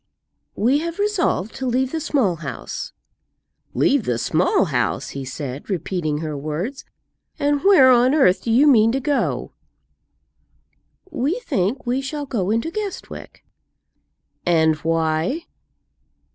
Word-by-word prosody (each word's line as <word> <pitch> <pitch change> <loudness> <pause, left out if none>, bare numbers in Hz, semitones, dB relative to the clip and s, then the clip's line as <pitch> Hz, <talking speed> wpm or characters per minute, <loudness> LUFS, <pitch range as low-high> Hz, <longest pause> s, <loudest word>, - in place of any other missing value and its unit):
"We 255 +7 +2
have 335 +1 -4
resolved 395 - 0
to 265 - -3
leave 255 +1 0
the 325 - -2
Small 240 - 0
House." 165 - -6 0.8
"Leave 275 -5 +2
the 120 - 0
Small 170 +9 +2
House!" 125 -8 -1
he 140 - -6
said, 135 +3 -6
repeating 170 -5 -2
her 155 -2 -4
words; 155 - -4 0.5
"and 285 0 0
where 320 -10 +7
on 250 +3 +4
earth 230 -12 +4
do - - -5
you 245 +6 +5
mean 225 -6 +5
to 270 - 0
go?" 285 +2 -1 1.6
"We 300 - -1
think 215 - -1
we 250 +2 0
shall 290 +2 -4
go 205 -8 -2
into 230 +9 0
Guestwick." 410 0 -7 1.0
"And 160 -2 +3
why?" 165 - 0
235 Hz, 130 wpm, -21 LUFS, -, 1.6 s, where